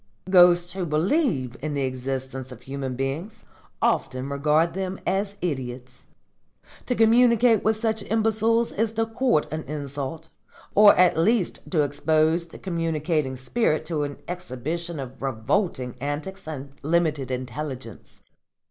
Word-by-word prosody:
Ghosts 175 Hz, -1 st, +6 dB
who 190 Hz, -1 st, -3 dB
believe 155 Hz, -, +1 dB
in 150 Hz, 0 st, -3 dB
the 140 Hz, -, 0 dB
existence 130 Hz, 0 st, -4 dB
of 125 Hz, -, -11 dB
human 135 Hz, -1 st, -4 dB
beings 150 Hz, -, -4 dB, 0.4 s
often 130 Hz, +1 st, 0 dB
regard 150 Hz, +4 st, +2 dB
them 190 Hz, 0 st, -3 dB
as 195 Hz, +2 st, -1 dB
idiots. 130 Hz, -5 st, -5 dB, 0.8 s
To 250 Hz, -, 0 dB
communicate 235 Hz, 0 st, +5 dB
with 220 Hz, 0 st, +2 dB
such 220 Hz, -1 st, 0 dB
imbeciles 225 Hz, +1 st, +2 dB
is 225 Hz, +1 st, -1 dB
to 225 Hz, 0 st, +1 dB
court 225 Hz, -, +1 dB
an 155 Hz, +1 st, -3 dB
insult, 145 Hz, +2 st, -5 dB, 0.4 s
or 205 Hz, 0 st, +8 dB
at 180 Hz, -2 st, +4 dB
least 205 Hz, +1 st, +1 dB
to 155 Hz, -5 st, +2 dB
expose 155 Hz, +4 st, +1 dB
the -, -, -12 dB
communicating 165 Hz, -5 st, -1 dB
spirit 155 Hz, -, 0 dB
to 155 Hz, -2 st, -2 dB
an 145 Hz, -1 st, -3 dB
exhibition 170 Hz, -1 st, -4 dB
of 130 Hz, -1 st, -8 dB
revolting 130 Hz, -, -1 dB
antics 155 Hz, +7 st, -4 dB
and 140 Hz, -3 st, -6 dB
limited 155 Hz, -3 st, +1 dB
intelligence. 130 Hz, -2 st, -6 dB
155 Hz, 130 wpm, -25 LUFS, 135-195 Hz, 0.8 s, or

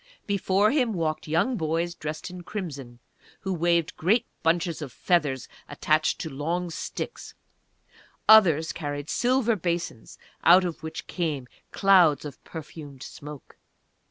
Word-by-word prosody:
Before 200 Hz, +1 st, +2 dB
him 255 Hz, -6 st, +1 dB
walked 160 Hz, -4 st, -2 dB
young 180 Hz, +11 st, +1 dB
boys 165 Hz, +1 st, -1 dB
dressed 155 Hz, +2 st, -6 dB
in 180 Hz, 0 st, -8 dB
crimson, 145 Hz, -, -6 dB, 0.4 s
who 190 Hz, -, -2 dB
waved 170 Hz, -1 st, +1 dB
great 210 Hz, +8 st, +2 dB, 0.2 s
bunches 165 Hz, -1 st, +1 dB
of 145 Hz, -4 st, -6 dB
feathers 145 Hz, -7 st, 0 dB, 0.2 s
attached 155 Hz, +2 st, +1 dB
to 160 Hz, -, -4 dB
long 170 Hz, +5 st, -2 dB
sticks; 475 Hz, -, -6 dB, 0.9 s
others 170 Hz, -8 st, +6 dB
carried 145 Hz, -2 st, -4 dB
silver 245 Hz, -2 st, +2 dB
basins 170 Hz, -, -4 dB, 0.3 s
out 180 Hz, +2 st, +7 dB
of 170 Hz, -2 st, -4 dB
which 160 Hz, +4 st, -6 dB
came 150 Hz, -8 st, -3 dB, 0.2 s
clouds 180 Hz, -8 st, +4 dB
of 145 Hz, -, -9 dB
perfumed 145 Hz, -4 st, -9 dB
smoke. 150 Hz, -1 st, -10 dB
165 Hz, 130 wpm, -26 LUFS, 150-185 Hz, 0.9 s, out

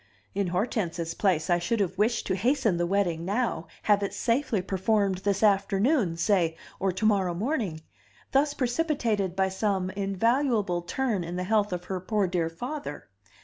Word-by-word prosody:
In 200 Hz, -1 st, 0 dB
Hortense's 175 Hz, -3 st, -1 dB
place 175 Hz, -6 st, +1 dB
I 175 Hz, -1 st, +3 dB
should 225 Hz, +6 st, -1 dB
have 190 Hz, -2 st, 0 dB
wished 220 Hz, +4 st, +1 dB
to -, -, 0 dB
hasten 235 Hz, -2 st, +1 dB
the 175 Hz, 0 st, 0 dB
wedding 175 Hz, -4 st, 0 dB
now, 200 Hz, -3 st, -1 dB, 0.2 s
have 205 Hz, -1 st, +3 dB
it 200 Hz, -, -3 dB
safely 235 Hz, -2 st, +1 dB
performed 195 Hz, +1 st, 0 dB
this 200 Hz, +1 st, 0 dB
afternoon, 200 Hz, -, +2 dB
say, 170 Hz, -3 st, +2 dB, 0.2 s
or 195 Hz, 0 st, +1 dB
to 185 Hz, +4 st, -2 dB
morrow 195 Hz, -5 st, +2 dB
morning; 210 Hz, -, -2 dB, 0.5 s
thus 285 Hz, +2 st, +2 dB
precipitated 240 Hz, -, 0 dB
by 190 Hz, 0 st, +2 dB
some 190 Hz, -1 st, -1 dB
invaluable 205 Hz, 0 st, +1 dB
turn 215 Hz, +1 st, -1 dB
in 170 Hz, +1 st, -5 dB
the 180 Hz, -, -2 dB
health 210 Hz, +1 st, +1 dB
of 180 Hz, -1 st, -3 dB
her 185 Hz, 0 st, -3 dB
poor 205 Hz, +2 st, 0 dB
dear 175 Hz, -3 st, 0 dB
father. 210 Hz, -, -6 dB
195 Hz, 165 wpm, -27 LUFS, 180-225 Hz, 0.5 s, I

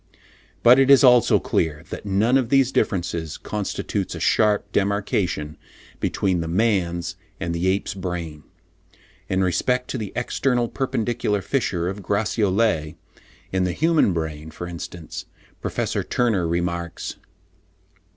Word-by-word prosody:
But 125 Hz, +3 st, +8 dB
it 135 Hz, 0 st, +4 dB
is 140 Hz, -1 st, +8 dB
also 125 Hz, -2 st, +6 dB
clear, 80 Hz, -1 st, -1 dB
that -, -, -6 dB
none 105 Hz, +6 st, +2 dB
of 130 Hz, -4 st, +2 dB
these 135 Hz, -1 st, +4 dB
differences 85 Hz, -, -1 dB
constitutes 105 Hz, -2 st, -3 dB
a -, -, -6 dB
sharp 105 Hz, -2 st, +3 dB
demarcation 100 Hz, -7 st, -1 dB, 0.4 s
between 95 Hz, -3 st, 0 dB
the 80 Hz, -, -3 dB
man's 90 Hz, -2 st, 0 dB, 0.2 s
and 85 Hz, 0 st, -2 dB
the 85 Hz, +2 st, -1 dB
ape's 95 Hz, +2 st, 0 dB
brain. 90 Hz, -5 st, -5 dB, 0.9 s
In 95 Hz, 0 st, +1 dB
respect 125 Hz, +7 st, 0 dB
to 130 Hz, -, -3 dB
the 105 Hz, -3 st, -5 dB
external 120 Hz, 0 st, 0 dB
perpendicular 115 Hz, -5 st, -1 dB
fissure 90 Hz, -10 st, -1 dB
of 100 Hz, +2 st, -4 dB
Gratiolet, 100 Hz, -4 st, +1 dB, 0.6 s
in 95 Hz, 0 st, +1 dB
the 90 Hz, -1 st, 0 dB
human 160 Hz, -, +3 dB
brain 80 Hz, -2 st, -4 dB
for 80 Hz, +2 st, -7 dB
instance, 85 Hz, -1 st, -7 dB, 0.4 s
Professor -, -, -2 dB
Turner 110 Hz, -8 st, +1 dB
remarks: 85 Hz, 0 st, -2 dB
(71. -, -, -11 dB
95 Hz, 130 wpm, -23 LUFS, 85-115 Hz, 0.9 s, But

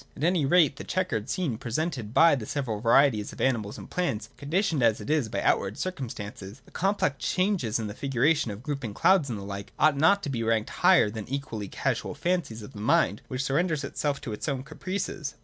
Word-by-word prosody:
At -, -, -5 dB
any 170 Hz, -4 st, +2 dB
rate, 155 Hz, -3 st, +4 dB
the -, -, -6 dB
chequered 130 Hz, -, -2 dB
scene 155 Hz, -, -1 dB
presented 125 Hz, -2 st, -3 dB
by 165 Hz, +7 st, +6 dB
the 120 Hz, -6 st, -2 dB
several 125 Hz, -7 st, -2 dB
varieties 115 Hz, -2 st, +4 dB
of -, -, -12 dB
animals 110 Hz, -6 st, 0 dB
and -, -, -9 dB
plants, 115 Hz, -12 st, -2 dB
conditioned 160 Hz, +1 st, 0 dB
as 115 Hz, -2 st, +3 dB
it -, -, -4 dB
is 150 Hz, -8 st, +1 dB
by 100 Hz, -, -2 dB
outward 100 Hz, +2 st, +1 dB
circumstances, 110 Hz, -, -6 dB
— -, -, -36 dB
the -, -, -19 dB
complex 190 Hz, -7 st, 0 dB
changes 185 Hz, -, +1 dB
in 115 Hz, -, -3 dB
the 105 Hz, -, -5 dB
figuration 135 Hz, +2 st, +1 dB
and 105 Hz, +3 st, -7 dB
grouping 140 Hz, -6 st, -3 dB
of -, -, -18 dB
clouds, 185 Hz, -7 st, +4 dB
and 115 Hz, -, -3 dB
the 100 Hz, -, -7 dB
like, 100 Hz, 0 st, -7 dB
ought 155 Hz, -2 st, +4 dB
not 165 Hz, +8 st, +4 dB
to -, -, -3 dB
be 120 Hz, -3 st, -2 dB
ranked 115 Hz, -1 st, 0 dB
higher 105 Hz, -, +4 dB
than 110 Hz, -1 st, -6 dB
the 135 Hz, -, -3 dB
equally 115 Hz, -7 st, -5 dB
casual -, -, -2 dB
fancies 170 Hz, -12 st, -2 dB
of 105 Hz, -, -11 dB
the 105 Hz, -, -9 dB
mind 105 Hz, -2 st, +2 dB
which 130 Hz, +1 st, -3 dB
surrenders 155 Hz, +2 st, 0 dB
itself 140 Hz, 0 st, -2 dB
to 125 Hz, -7 st, -5 dB
its 105 Hz, -, -4 dB
own 135 Hz, -2 st, -2 dB
caprices. 160 Hz, -1 st, -4 dB
135 Hz, 220 wpm, -27 LUFS, 110-155 Hz, -, by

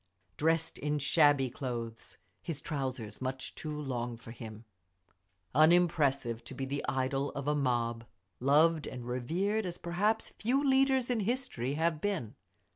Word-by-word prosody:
Dressed 165 Hz, +1 st, +1 dB
in 150 Hz, 0 st, 0 dB
shabby 145 Hz, -2 st, +4 dB
clothes, 120 Hz, -3 st, -5 dB, 0.2 s
his 160 Hz, -4 st, -4 dB
trousers 130 Hz, -8 st, -4 dB
much 130 Hz, 0 st, -4 dB
too 150 Hz, -1 st, -5 dB
long 120 Hz, -4 st, -3 dB
for 115 Hz, 0 st, -11 dB
him. 110 Hz, -1 st, -9 dB, 0.9 s
Unimpressive, 145 Hz, -6 st, +3 dB
to 135 Hz, -, -8 dB
be 135 Hz, -, -3 dB
the 140 Hz, +2 st, -3 dB
idol 135 Hz, +1 st, 0 dB
of 140 Hz, 0 st, -4 dB
a 150 Hz, -, +3 dB
mob, 120 Hz, -5 st, 0 dB, 0.3 s
loved 155 Hz, +4 st, +4 dB
and 125 Hz, -2 st, -6 dB
revered 170 Hz, -, 0 dB
as 180 Hz, -2 st, -4 dB
perhaps 205 Hz, +7 st, 0 dB
few 270 Hz, +6 st, 0 dB
leaders 265 Hz, -2 st, +3 dB
in 240 Hz, -, +1 dB
history 200 Hz, -, -1 dB
have 160 Hz, 0 st, 0 dB
been. 190 Hz, -, -2 dB
145 Hz, 140 wpm, -32 LUFS, 125-170 Hz, 0.9 s, shabby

